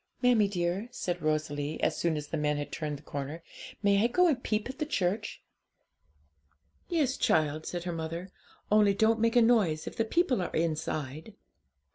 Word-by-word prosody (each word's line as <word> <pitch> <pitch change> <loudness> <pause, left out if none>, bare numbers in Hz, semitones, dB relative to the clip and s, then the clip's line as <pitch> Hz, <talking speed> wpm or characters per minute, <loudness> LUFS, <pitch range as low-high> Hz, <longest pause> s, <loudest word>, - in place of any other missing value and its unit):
'Mammie 235 -4 +5
dear,' 180 +2 -1
said 175 -7 -3
Rosalie, 155 -1 -1
as - - +2
soon 165 -2 0
as 150 -1 -6
the - - -2
men 150 -1 0
had 145 - -5
turned 150 -2 -3
the 145 - -17
corner, 145 +4 -5 0.4
'may 200 0 +4
I - - +5
go 360 +10 +3
and 290 -7 +2
peep 215 -1 -1
at 265 +2 -8
the 305 - 0
church?' 205 - -2 1.5
'Yes, 290 -6 +1
child,' 155 -8 +1
said 175 -1 -4
her 175 -1 -3
mother; 165 +3 -5 0.4
'only 210 -2 +5
don't 220 +2 +3
make 230 +1 +2
a 240 - +7
noise 205 -10 +3
if - - -6
the 225 - +2
people 260 - +1
are 180 - -2
inside.' 155 +2 -2
180 Hz, 180 wpm, -29 LUFS, 155-225 Hz, 1.5 s, a